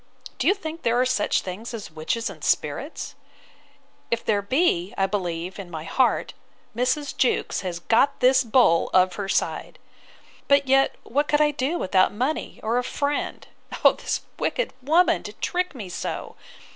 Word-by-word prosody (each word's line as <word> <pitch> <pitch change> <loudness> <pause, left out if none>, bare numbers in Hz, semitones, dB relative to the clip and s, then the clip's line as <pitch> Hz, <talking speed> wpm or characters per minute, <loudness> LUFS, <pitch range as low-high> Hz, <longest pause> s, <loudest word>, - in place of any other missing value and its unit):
—Do - - 0
you 395 - +5
think 325 -4 -7
there 235 +1 +2
are 255 - +3
such 250 -5 +1
things 215 +6 -6
as 210 -7 -8
witches 160 +9 -2
and 180 -7 -9
spirits? 155 - -1 1.0
If 235 0 -1
there 205 -2 +2
be, 200 - +1
I 195 - +3
believe, 180 -2 -3
in 190 -3 -7
my 160 -2 -6
heart, 250 +9 +1 0.4
Mrs. 255 +4 0
Jewkes 255 - +1
has 180 -3 -4
got 275 +8 +2
this 260 +1 +5
bull 225 -8 +3
of 185 0 +5
her 195 0 -5
side. - - -1 0.7
But 280 -1 +4
yet, 270 +1 +3
what 290 +5 0
could 295 - +2
I 300 0 +4
do 290 +4 -1
without 185 - +3
money, 255 +9 -2
or 230 +3 +1
a - - -2
friend'—O 285 +3 -1
this - - -3 0.2
wicked - - -1
woman! 325 +7 +3
to - - -8
trick 360 -3 -2
me 215 -7 -6
so! 180 - -5
240 Hz, 165 wpm, -24 LUFS, 190-280 Hz, 1.0 s, you